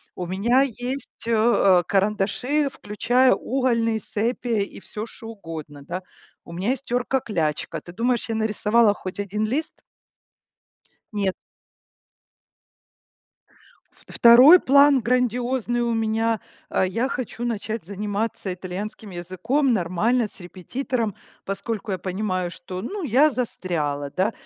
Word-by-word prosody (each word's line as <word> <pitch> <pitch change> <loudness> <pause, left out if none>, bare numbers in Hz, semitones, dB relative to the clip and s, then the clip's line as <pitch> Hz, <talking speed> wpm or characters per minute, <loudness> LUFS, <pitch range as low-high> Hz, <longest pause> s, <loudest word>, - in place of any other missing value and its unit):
у 180 - -4
меня 210 +9 +2
есть, 255 -1 -5
э, - - 0
э, 215 -5 +4
карандаши, 210 +9 +1
включая 245 +3 +2
угольные, 230 -3 0
сепия 230 +2 -1
и - - -9
всё 215 +2 -6
что 225 0 -11
угодно, 160 -8 -8
да. 175 +6 -5 0.4
У - - -12
меня 185 +6 -2
есть 270 0 -3
терка-клячка. 235 - -1
Ты 175 - -12
думаешь, 235 +4 0
я 225 - -2
нарисовала 220 0 +3
хоть 185 0 -7
один 205 +2 -1
лист? 280 +9 -3 1.3
Нет. 200 -3 0 2.7
Второй 250 +9 +8
план 280 -2 +5
грандиозный 245 0 0
у 235 0 0
меня. 225 0 0 0.3
А, - - +2
я 230 +8 -1
хочу 245 -2 -4
начать 225 -2 -3
заниматься 205 0 -3
итальянским 195 +4 -6
языком 220 - 0
нормально 210 +6 +1
с 195 - -12
репетитором, 220 +5 -3 0.3
поскольку 210 +2 -4
я 190 - -2
понимаю, 185 -1 -2
что, 180 +1 -7
ну, 390 - -5
я 290 +2 +4
застряла, 160 - -2
да. 190 +8 0
220 Hz, 120 wpm, -23 LUFS, 190-245 Hz, 2.7 s, Второй